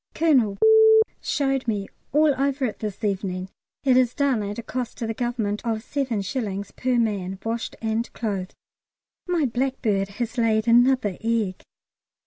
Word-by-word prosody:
Colonel 255 -11 +3 0.6
showed 270 -3 -1
me 205 -3 -1 0.2
all 300 +1 +4
over 275 0 0
it 220 - -4
this 215 0 -5
evening. 190 -2 -2 0.3
It 265 -2 +4
is 250 -1 +2
done 275 -6 +1
at 205 0 -4
a 235 - -5
cost 245 +1 -4
to 230 - -3
the 225 - -2
Government 225 -3 -2
of 230 -2 0
7d. 210 -6 -3
per 255 -1 0
man, 200 -5 -1
washed 230 +1 -3
and 225 +1 -1
clothed. 195 -5 -4 0.7
My 345 -4 +1
blackbird 240 -5 0
has 240 0 -3
laid 220 -1 +2
another 240 -4 +3
egg. 225 -5 -1
230 Hz, 145 wpm, -24 LUFS, 205-255 Hz, 0.7 s, all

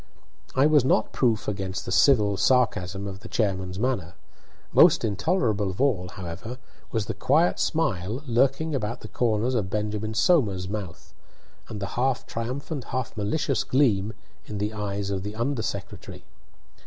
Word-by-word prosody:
I 135 +2 +5
was 150 -3 +5
not 125 -4 +2
proof 115 -5 +1
against 95 -2 -3
the - - -5
civil 105 -3 +4
sarcasm 100 -5 +1
of 95 -1 -6
the - - -11
chairman's 95 -4 -1
manner. 105 -7 -1 0.6
Most - - +6
intolerable 110 - 0
of 95 - -7
all, 120 -10 +1
however, 95 +8 -7 0.3
was 110 -3 -1
the - - -3
quiet 165 +3 +2
smile 115 - -1
lurking 135 +5 +1
about 115 -4 -2
the - - -8
corners 115 +1 0
of 105 -6 0
Benjamin 105 +1 -2
Somers's 100 - +2
mouth, 100 -4 -6 0.6
and 110 - -5
the 100 - -2
half 130 0 +1
triumphant, 130 +4 -4
half 130 -2 -4
malicious 120 +6 0
gleam 115 -6 +2 0.3
in 105 - -5
the 105 +2 -2
eyes 100 -1 -3
of 95 -1 -2
the 105 +2 -6
under 120 +2 -1
secretary. - - -6
110 Hz, 155 wpm, -26 LUFS, 100-130 Hz, 0.6 s, Most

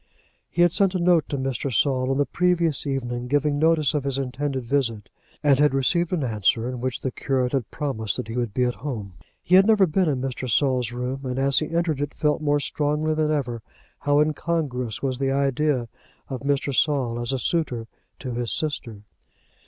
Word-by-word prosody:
He 175 - +2
had 175 - +4
sent 195 +1 +2
a - - +1
note 170 -2 +3
to 140 - -2
Mr. 135 0 -2
Saul 130 +1 +1
on 135 - +1
the 145 - +2
previous 170 -1 +2
evening 125 -3 -3
giving 145 +2 +1
notice 160 -1 +3
of 145 -3 -1
his 135 -1 -1
intended 135 0 -3
visit, 115 -5 -1 0.3
and 140 -2 +4
had 145 -2 +4
received 170 +6 +1
an 175 -6 0
answer, 115 0 +1
in 125 -1 -5
which 130 -1 -3
the 130 - -2
curate 130 -2 -1
had 130 -6 -1
promised 110 -8 -3
that - - -4
he 115 - -6
would 120 -3 -1
be 125 - 0
at 125 0 +1
home. 110 -9 -5 0.3
He 180 - -2
had 190 +2 +7
never 215 -3 +5
before 185 +3 +1
been 155 - +1
in 130 - -3
Mr. 130 0 -5
Saul's 125 -1 +2
room, 125 +2 -3
and 125 -1 -3
as 135 0 +3
he 155 - -3
entered 165 -4 0
it, 145 0 -3
felt 150 0 +1
more 145 -1 +2
strongly 150 +2 -1
than 155 -1 0
ever 125 -6 -1 0.4
how 145 0 +2
incongruous 150 -7 -2
was 130 -2 -1
the 135 -1 0
idea 135 -1 +1 0.4
of 130 -2 -4
Mr. 140 0 0
Saul 130 -6 +1
as 120 +2 -2
a 135 - 0
suitor 130 -5 -1 0.3
to 130 - -6
his 120 -1 -3
sister. 120 -9 -3
135 Hz, 205 wpm, -24 LUFS, 125-150 Hz, 0.4 s, had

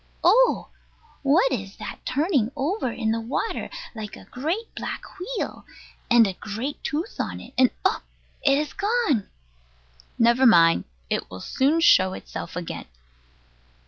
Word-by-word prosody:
Oh! 460 +9 +4 0.5
What 280 0 +4
is 200 -6 -4
that - - -8
turning 275 - +1
over 285 - -1
in 220 -2 -1
the 230 0 -1
water, 250 - -3 0.2
like 215 -3 -7
a - - -13
great 330 - -3
black - - -5 0.2
wheel? 420 +6 -4 0.5
And 240 -2 +7
a 195 - -1
great 220 +9 -5
tooth 320 +8 -3
on - - -2
it, - - -12
and 255 -1 +5 0.2
oh! - - +2 0.4
it 275 -1 +4
is 300 0 -2
gone! 405 - +1 0.9
Never 235 +3 +5
mind. 165 -6 +6 0.3
It - - -1
will 95 - -8
soon 285 - +1
show 185 - +5
itself 170 - -7
again. 175 -2 -5
260 Hz, 145 wpm, -24 LUFS, 220-325 Hz, 0.9 s, And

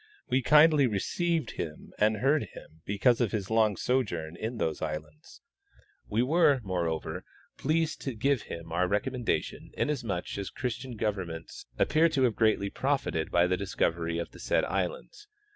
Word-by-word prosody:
We 130 - +3
kindly 150 0 +6
received 160 - -1
him 75 -2 -7
and 110 +1 +3
heard 135 +3 +2
him 80 +1 -13
because 105 +5 +2
of 115 - +1
his 105 -2 -3
long 110 -3 +3
sojourn 85 -11 -1
in 115 +6 -4
those 80 -7 -1
islands. 75 - -6 0.7
We 110 +3 +1
were, 145 -1 +4
moreover, 85 -5 -2 0.4
pleased 160 +2 0
to 135 -4 -4
give 135 +3 +1
him 85 -1 -7
our 90 +2 +1
recommendation, 120 +5 -2
inasmuch 115 -11 -2
as 100 - -4
Christian 125 0 -4
govern 105 -4 -1
ments 80 -4 -9
appear 160 +2 +4
to 140 -4 +1
have 120 -4 +2
greatly 110 -3 +2
profited 135 - -1
by 85 0 +4
the 90 +1 +1
discovery 85 -4 -1
of 85 -1 -4
the - - -14
said - - +1
islands. 485 -4 -4
110 Hz, 160 wpm, -29 LUFS, 90-135 Hz, 0.7 s, kindly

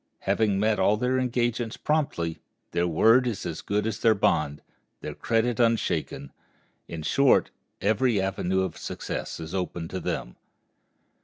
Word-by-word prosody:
Having 100 0 +1
met 110 +1 +2
all 100 +3 +3
their 125 +3 +1
engagements 120 -2 -1
promptly, 140 - -1 0.3
their 85 0 +1
word 115 +10 +4
is 110 -5 -3
as 80 - -4
good 105 +1 -1
as 110 -1 -2
their 110 -1 +4
bond, 75 -6 +1 0.4
their - - -5
credit 115 +1 0
unshaken; 115 -1 0 0.6
in 80 -2 -6
short, 135 - +3 0.3
every 110 +2 +2
avenue 95 -1 0
of 95 -3 -3
success - - -5
is 80 +1 -7
open 90 -3 -3
to 95 - -4
them. - - -4
105 Hz, 145 wpm, -26 LUFS, 90-120 Hz, 0.6 s, word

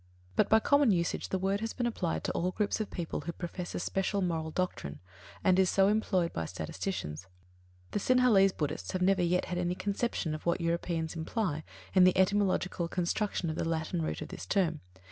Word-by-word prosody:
But, - - +3
by 220 - +6
common 285 +2 +4
usage 170 -3 0
the 190 - 0
word 195 +2 0
has 225 +1 -3
been 245 - -2
applied 195 -8 -1
to - - -1
all 180 - 0
groups 205 +3 -1
of 215 - -3
people 170 -4 -4
who 165 +4 -4
profess 175 +1 -6
a - - -1
special 195 +3 -1
moral 165 -3 -1
doctrine, 155 - -3 0.4
and 185 0 +4
is 190 -1 +4
so 195 0 +4
employed 190 -5 +1
by 80 - -2
statisticians. 80 - -4 0.6
The - - 0
Sinhalese 230 -5 +5
Buddhists 150 -5 -3
have 185 -1 0
never 190 0 +3
yet 180 +1 +2
had 180 -1 -3
any 180 0 0
conception 200 -4 -1
of 155 - -6
what 170 +2 +1
Europeans 170 -1 -1
imply 160 -2 -2 0.3
in 185 - +6
the 185 0 +5
etymological 190 -2 +2
construction 180 0 -1
of - - -4
the 165 - -1
Latin 165 +1 -1
root 155 - -2
of - - -10
this - - -8
term. 175 -6 +1
180 Hz, 200 wpm, -31 LUFS, 165-195 Hz, 0.6 s, by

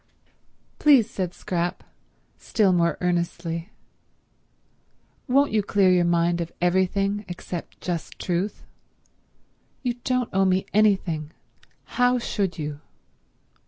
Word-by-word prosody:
"Please," 275 -8 +6
said 185 -6 -3
Scrap, 175 -1 -3 0.6
still 200 -4 +2
more 170 -1 +2
earnestly, 170 -1 -2 1.6
"won't 280 +2 +3
you 215 - +2
clear 195 -2 +3
your 180 -1 +4
mind 170 0 +2
of 170 - -4
everything 190 +3 +1
except 175 -1 -7
just 175 -3 -4
truth? 180 +3 -2 1.2
You 245 -2 0
don't 255 -2 0
owe 195 0 +3
me 185 0 +2
anything. 190 -7 +2 0.5
How 245 0 +2
should 200 -7 -2
you?" 150 -2 -5
185 Hz, 105 wpm, -24 LUFS, 170-210 Hz, 1.6 s, Please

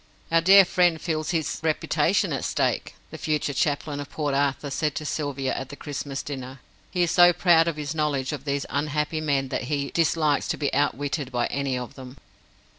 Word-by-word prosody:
"Our 165 0 +4
dear 195 +3 +8
friend 175 -2 +2
feels 155 -2 -2
his 160 -3 -1
reputation 160 -1 +1
at - - -3
stake," - - -1 0.2
the - - -8
future 150 -2 -1
chaplain 145 +1 -1
of 145 - -6
Port 145 -3 -2
Arthur 140 0 0
said 150 +1 -1
to 155 - -4
Sylvia 140 -3 -2
at 135 - -5
the 145 - -8
Christmas 145 -2 -5
dinner. 130 -2 -7 0.3
"He 180 -1 +1
is 170 - +1
so 175 +1 +7
proud 170 -2 +4
of 165 - -1
his 145 -1 -4
knowledge 145 -4 -1
of 145 -3 -5
these 140 -1 -2
unhappy 150 +2 -1
men 140 -3 0
that 130 - -3
he 140 +1 -2
dislikes 155 -3 +1
to - - -2
be 145 -2 -1
outwitted 145 0 -1
by 120 -1 0
any 140 -2 -1
of 125 -1 -6
them." 130 0 -11
145 Hz, 195 wpm, -25 LUFS, 140-160 Hz, 0.3 s, dear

